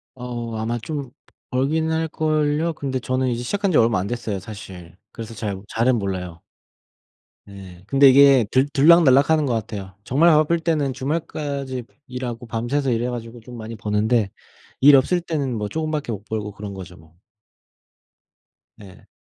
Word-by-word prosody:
어 120 -2 -6
아마 115 +2 -2
좀 140 0 -5 0.4
벌기는 155 +5 0
할 160 0 0
걸요? 155 +1 0
근데 135 -3 -3
저는 130 +1 -1
이제 120 0 -2
시작한지 195 +4 0
얼마 115 -4 +3
안 95 - -3
됐어요 110 -4 -3
사실. 95 -4 -11
그래서 115 -1 -8
잘 100 -4 -4
잘은 120 +2 +1
몰라요. 90 -4 -4 1.0
네. 95 -3 -12
근데 135 +2 +6
이게 135 -3 +6
들 130 +2 +3
들락날락 145 -2 +5
하는 155 -2 +3
것 125 - 0
같아요. 100 -4 -5
정말 145 +10 +3
바쁠 155 +1 +3
때는 155 -5 0
주말까지 140 -2 -4 0.2
일하고 125 -1 -5
밤새서 120 +4 -1
일해 120 +1 0
가지고 120 0 -7
좀 120 +1 -11
많이 115 +1 -7
버는데 105 0 0 0.5
일 140 +1 +8
없을 160 +7 +3
때는 140 -8 -2
뭐 105 - -3
쪼금밖에 155 -1 -3
못 105 -1 -6
벌고 105 -2 -4
그런 100 0 -7
거죠 90 -2 -9
뭐. 80 +1 -21 1.6
네. 95 -3 -15
125 Hz, 310 characters per minute, -22 LUFS, 105-145 Hz, 1.6 s, 일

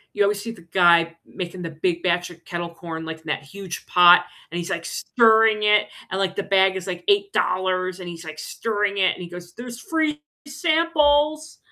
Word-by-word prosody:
you 205 - -1
always 200 0 +2
see 230 +3 -6
the 225 - -13
guy 170 -1 +3
making 180 0 -7
the 165 - -5
big 170 +2 -2
batch 175 -1 0
of 170 -1 -16
kettle 175 -1 -4
corn, 165 -1 -8
like, 160 0 -6
in - - -31
that 150 - -2
huge 185 +4 -8
pot, 175 0 +7 0.3
and 170 - -3
he's, 170 - -5
like, 170 0 -3
stirring 220 -2 +3
it, 210 0 +4 0.2
and, 190 - -2
like, 190 -1 -1
the 200 - -2
bag 190 -1 +3
is, 190 -2 -5
like, 180 -2 -5
$8, 185 - 0
and 180 - -8
he's, 170 -1 -8
like, 155 -1 -9
stirring 205 +3 -2
it, 185 -1 +3
and 180 - -9
he - - -7
goes, 175 0 -11
"There's 240 0 -8
free 310 0 -1 0.3
samples." 310 -1 +1
185 Hz, 205 wpm, -22 LUFS, 175-225 Hz, 0.3 s, pot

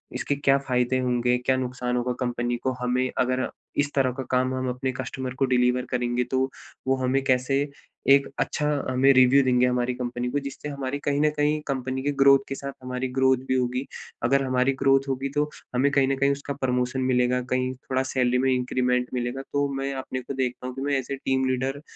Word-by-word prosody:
इसके 145 - -1
क्या 140 -1 +3
फायदे 125 0 +1
होंगे, 125 -1 +1
क्या 130 - +3
नुकसान 125 -1 -2
होगा 125 +1 -1
कंपनी 120 -1 -1
को 130 - +1
हमें 125 +1 +1
अगर 130 0 +1 0.3
इस 145 0 +1
तरह 130 -2 +3
का 130 - -3
काम 130 0 +2
हम 130 0 -2
अपने 125 +1 -2
कस्टमर 130 0 -5
को 135 - +4
डिलीवर 125 0 +2
करेंगे 125 0 0
तो, 130 0 +1 0.4
वो 135 - +3
हमें 130 +1 +1
कैसे 135 +2 +1 0.4
एक 140 0 +6
अच्छा 150 - -1 0.2
हमें 130 +2 +4
रिव्यू 130 +2 +6
देंगे 125 -1 +3
हमारी 125 0 0
कंपनी 125 0 -3
को 145 - 0
जिससे 140 +1 -7
हमारी 140 0 -4
कहीं 145 0 +1
न 150 - +4
कहीं 150 +1 +2
कंपनी 130 -1 -2
की 145 - +1
ग्रोथ 140 0 +7
के 135 - -3
साथ 140 0 -5
हमारी 130 0 -3
ग्रोथ 130 -1 +4
भी 130 - +1
होगी। 125 +1 0 0.4
अगर 135 +3 +3
हमारी 130 +1 +2
ग्रोथ 135 0 +3
होगी 135 +1 -2
तो 150 0 +1 0.3
हमें 140 +3 +3
कहीं 135 -1 +3
न 135 - +1
कहीं 140 +1 +3
उसका 140 0 -3
प्रमोशन 125 0 0
मिलेगा 125 -1 +2
कहीं 130 0 0
थोड़ा 130 +1 -2
सैलरी 125 -1 +1
में 130 +1 +2
इंक्रीमेंट 125 0 +1
मिलेगा 125 +2 -2
तो 145 0 +2
मैं 135 0 -2
अपने 130 -1 -4
को 140 - -6
देखता 125 -1 -2
हूँ 130 - -6
कि 135 - -5
मैं 140 0 -1
एज़ 135 +1 -5
ए - - -1
टीम 130 0 +1
लीडर 130 +2 -1
130 Hz, 210 wpm, -25 LUFS, 125-135 Hz, 0.4 s, ग्रोथ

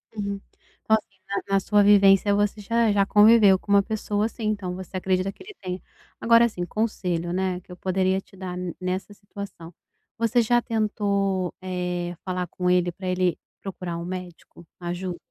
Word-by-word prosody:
Uhum, 200 -1 -3 0.4
então 220 - +4
assim, 195 -3 -13 0.3
na - - -1
na - - +5
sua 205 +1 +3
vivência, 200 0 +6
você 205 +1 0
já 230 +2 +2
já 200 -1 +3
conviveu 210 -1 +6
com 200 - -7
uma 200 0 +6
pessoa 210 -1 -1
assim, 230 +1 -5
então 200 -4 -2
você 185 0 -6
acredita 185 +1 0
que 380 - -15
ele 415 +1 -12
tenha. 185 -1 -5 0.4
Agora 230 0 +6
assim, 180 -6 -3
conselho, 180 -4 -2
né, 185 -1 -1
que 180 - -18
eu 180 - -9
poderia 190 +1 +1
te 195 - -21
dar 185 -1 -5
ne 180 -2 -4
nessa 185 +2 -3
situação, 200 -4 -10 0.4
você 230 +1 +2
já 240 +1 +3
tentou, 200 -5 0
eh, 180 -1 -3
falar 180 -1 -2
com 180 +2 -2
ele 180 -1 +3
para 185 +2 -8
ele 180 -1 +1 0.2
procurar 180 -3 -5
um 170 - -5
médico, 180 -2 -8
ajuda? 175 0 -4
190 Hz, 180 wpm, -25 LUFS, 180-205 Hz, 0.4 s, vivência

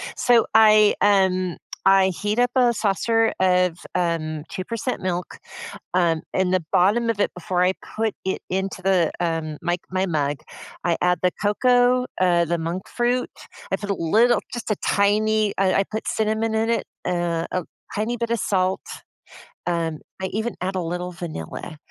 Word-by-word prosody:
So 240 -2 +4
I, 215 -1 +6
um, 185 -3 +2 0.3
I 195 0 +5
heat 205 +5 -2
up 245 0 +3
a 245 -2 +4
saucer 225 +2 +1
of, 180 -2 +2
um, 165 -3 -1
2% 230 +6 -4
milk. 180 -1 -3 0.6
Um, 170 -3 +2
in 190 -1 +1
the 185 -2 +1
bottom 210 +6 +3
of 225 -3 -1
it, - - +2
before 180 0 -1
I 180 +1 +3 0.2
put 220 0 0
it 190 - -2
into 190 0 -2
the, 185 -4 +2
um, 165 -3 -2
my 175 - +1
c 175 - -6
my 185 +1 0
mug, 145 -4 -1 0.5
I 170 -1 +2
add 180 0 +2
the 180 - +3
cocoa, 245 +4 +3
uh, 175 -2 +4
the 170 +1 -1
monk 170 +3 -4
fruit. 245 +1 0 0.4
I - - +1
put 205 -1 -6
a - - +2
little 220 +8 +3
just 240 -2 -5
a - - -1
tiny 210 +1 +2
I 190 -1 +2
I - - +1
put 220 0 -4
cinnamon 220 +1 0
in 220 +1 +1
it, 235 - 0 0.2
uh, 170 -2 -1
a 185 -2 -1 0.3
tiny 220 +3 -1
bit 235 0 -3
of 235 - 0
salt. 185 -1 +1 0.9
Um, 165 -3 -1 0.2
I - - -1
even 220 +5 -3
add 190 +1 -2
a 185 - 0
little 180 +2 -4
vanilla. 170 - -7
190 Hz, 175 wpm, -23 LUFS, 175-220 Hz, 0.9 s, I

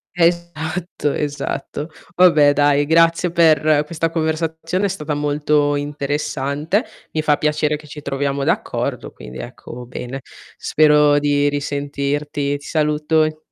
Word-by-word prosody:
Esatto 170 -2 -1
esatto. 145 +1 -4 0.3
Vabbè 155 -5 +6
dai, 145 0 +3
grazie 165 +2 +3
per 155 -3 +4
questa 165 +1 -2
conversazione 160 +3 -1
è - - +3
stata 155 -5 -3
molto 145 0 +1
interessante. 145 - -2 0.3
Mi 155 - 0
fa 150 -1 +2
piacere 150 0 0
che 150 0 -15
ci 150 0 -9
troviamo 140 0 -2
d'accordo - - -2
quindi 65 0 -10
ecco 120 - -9
bene. 125 +2 -6 0.4
Spero 150 -1 +4
di 145 0 +2
risentirti. 145 0 -2
Ti 145 - -15
saluto 155 0 +1
e 155 0 -2
150 Hz, 125 wpm, -19 LUFS, 145-160 Hz, 0.4 s, Vabbè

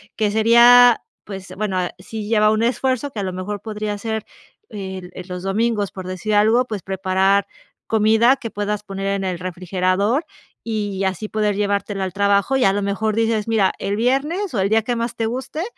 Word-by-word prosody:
que 210 -2 0
sería 235 +2 +6 0.2
pues 195 -2 -8
bueno, 200 -2 -2
ah, 180 -1 -1
si 210 +3 -7
ya 225 -2 +3
va 215 - +5
un 220 +1 +1
esfuerzo 260 +3 0
que 225 - -6
a - - -2
lo 185 - -3
mejor 190 +3 -5
podría 210 -1 -4
ser 220 0 -3 0.4
el, 190 -3 -7
eh, 185 - -7
los 180 0 -6
domingos, 205 +1 0
por 185 -1 -8
decir 185 +4 -3
algo, 220 +4 +4
pues 215 -6 -5
preparar 190 +1 +1 0.4
comida 225 +4 +4
que 230 - -6
puedas 205 0 -3
poner 195 -1 -6
en 195 0 -1
el 185 -2 -2
refrigerador 185 - -1 0.4
y 205 -4 -3
así 190 +3 -3
poder 210 -1 0
llevártela 200 -1 -1
al 185 - -4
trabajo. 200 +6 +2
Y 260 - +2
a 195 - +4
lo 205 - -1
mejor 205 +2 -1
dices: 225 -1 0
"Mira 220 -4 +2
el 200 - -2
viernes", 290 - 0
o - - 0
el 190 +1 +1
día 220 +1 +3
que 245 +2 -2
más 235 0 -3
te 225 - -1
guste, 260 +7 -4
210 Hz, 200 wpm, -20 LUFS, 195-225 Hz, 0.4 s, sería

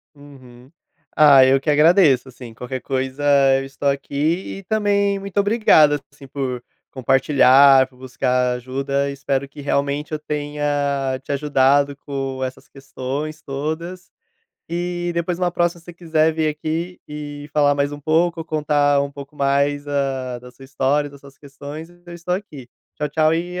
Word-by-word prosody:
Uhum. 130 -2 -16 0.4
Ah, 140 -4 +7
eu 135 +1 +4
que 150 - -3
agradeço, 150 -3 +4
assim. 120 -2 -11
Qualquer 125 +3 -6
coisa 130 +1 -3 0.4
eu 135 - -5
estou 140 +1 -2
aqui 145 +7 -2
e - - -13
também 200 -1 +1
muito 195 0 -9
obrigado, 200 - +4
assim, 145 -1 -15
por 130 -2 -4 0.3
compartilhar, 135 0 +5
por 130 -1 -24
buscar 125 -1 0
ajuda, 135 +3 -2
e - - -4
espero 135 0 -2
que 145 +1 -12
realmente 140 +2 -1
eu 155 - -1
tenha 145 -3 -2
te - - -6
ajudado 140 0 +2
com 135 -2 -5
essas 130 0 -6
questões 135 +3 -6
todas 160 +6 -5 0.6
e 175 0 -3
depois 170 +1 -2
numa 180 -1 0
próxima, 175 0 0
se - - -25
você 175 - -10
quiser 160 -2 +1
vir 155 -1 0
aqui 160 +4 -4
e 145 0 -8
falar 145 -1 +3
mais 140 0 -1
um 145 - -8
pouco, 165 +2 +1
contar 145 -2 +1
um 140 0 -5
pouco 140 +1 -11
mais 140 +1 0
a 135 -3 -2
da 125 +1 -13
sua 135 +2 -16
história 140 +2 0
e - - -16
das 140 -1 -15
suas 140 -1 -16
questões, 145 +3 -10
eu 175 0 -14
estou 175 +1 -3
aqui. 155 -10 -8 0.3
Tchau, 150 0 -2
tchau 155 +1 +2
e 180 +2 -3
145 Hz, 165 wpm, -20 LUFS, 135-160 Hz, 0.6 s, Ah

